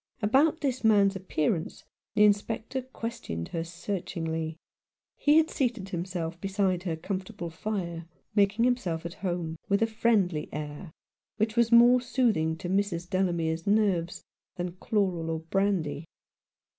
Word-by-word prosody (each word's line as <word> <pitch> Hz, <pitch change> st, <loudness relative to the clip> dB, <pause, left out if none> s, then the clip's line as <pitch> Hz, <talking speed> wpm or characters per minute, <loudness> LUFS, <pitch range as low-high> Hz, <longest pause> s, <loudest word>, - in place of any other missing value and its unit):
About 285 Hz, +9 st, +3 dB
this 260 Hz, -4 st, -1 dB
man's 200 Hz, -3 st, +5 dB
appearance 165 Hz, -3 st, -2 dB, 0.3 s
the 210 Hz, -, +5 dB
Inspector 220 Hz, +5 st, +1 dB
ques 230 Hz, -1 st, -5 dB
tioned 85 Hz, 0 st, -5 dB
her 165 Hz, -1 st, -2 dB
searchingly. 165 Hz, -2 st, -4 dB, 0.6 s
He 295 Hz, +1 st, +4 dB
had 320 Hz, 0 st, +4 dB
seated 235 Hz, -7 st, -1 dB
himself 175 Hz, -2 st, -4 dB
beside 195 Hz, -2 st, 0 dB
her 175 Hz, -3 st, -2 dB
comfortable 185 Hz, +1 st, -5 dB
fire, 170 Hz, -2 st, -4 dB, 0.3 s
making 205 Hz, +2 st, +3 dB
himself 185 Hz, -10 st, 0 dB
at 170 Hz, -, -4 dB
home, 175 Hz, -3 st, -2 dB
with 200 Hz, +2 st, +3 dB
a -, -, +5 dB
friendly 215 Hz, -8 st, +1 dB
air 150 Hz, +3 st, -6 dB, 0.5 s
which 220 Hz, +1 st, 0 dB
was 235 Hz, -1 st, +3 dB
more 240 Hz, +1 st, +7 dB
soothing 230 Hz, -11 st, +1 dB
to 175 Hz, -, -6 dB
Mrs. 185 Hz, -2 st, 0 dB
Delamere's 170 Hz, -3 st, 0 dB
nerves 200 Hz, -5 st, +1 dB, 0.3 s
than 175 Hz, 0 st, -3 dB
chloral 185 Hz, -5 st, 0 dB
or 160 Hz, -1 st, -2 dB
brandy. 165 Hz, -4 st, 0 dB
190 Hz, 135 wpm, -28 LUFS, 165-220 Hz, 0.6 s, more